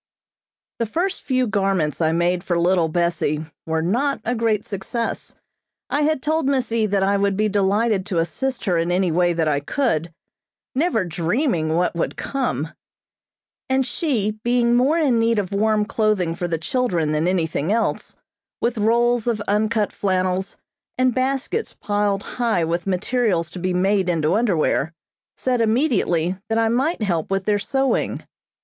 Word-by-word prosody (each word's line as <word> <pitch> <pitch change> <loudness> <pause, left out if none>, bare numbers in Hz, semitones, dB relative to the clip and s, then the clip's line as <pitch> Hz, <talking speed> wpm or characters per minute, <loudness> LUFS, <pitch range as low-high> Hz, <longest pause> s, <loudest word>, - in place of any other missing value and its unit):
The 230 - 0
first 360 - -2
few 255 -1 +1
garments 195 -8 0
I 160 -1 +3
made 175 +2 +1
for 175 -3 0
Little 175 -1 +3
Bessie 160 -2 0 0.2
were 160 0 0
not 260 - 0
a 245 - 0
great 225 -3 0
success. 220 +4 -4 0.6
I 290 - +1
had 300 -2 +1
told 315 -2 +1
Miss 260 -5 0
E. 225 -2 +2
that 200 -1 +1
I 200 +1 +2
would 200 -1 +1
be 215 0 +2
delighted 205 0 +1
to 190 -4 -2
assist 240 +10 -2
her 180 -4 +2
in 170 +1 0
any 180 -1 +1
way 175 +1 +2
that 165 -2 0
I 145 -2 +2
could, 165 - -1 0.6
never 260 - +1
dreaming 170 - 0
what 175 +1 +1
would 170 - -2
come; 165 - -2 1.0
and 265 0 +2
she 245 - -1
being 240 0 +2
more 270 +7 +3
in 270 -8 +2
need 230 0 +2
of 200 -2 -1
warm 210 +1 +2
clothing 210 -6 0
for 175 +1 -3
the 165 -1 -1
children 170 -4 0
than 155 +2 +1
anything 165 -2 0
else, 225 +1 -1 0.4
with 235 -1 -1
rolls 235 +2 +2
of 230 -3 +1
uncut 210 +1 +1
flannels, 185 -1 -1 0.4
and 255 -1 +3
baskets 270 - -1
piled 205 -1 -1
high 230 -8 0
with 170 +3 -2
materials 190 -3 0
to 180 - -7
be 185 +1 -1
made 190 +1 +1
into 160 -1 +1
underwear, 175 -7 +1 0.4
said 250 -2 0
immediately 215 - +1
that 225 - +1
I 225 0 +2
might 260 +3 0
help 170 -6 -1
with 195 0 0
their 205 +1 +1
sewing. 270 +4 0
205 Hz, 165 wpm, -22 LUFS, 175-240 Hz, 1.0 s, I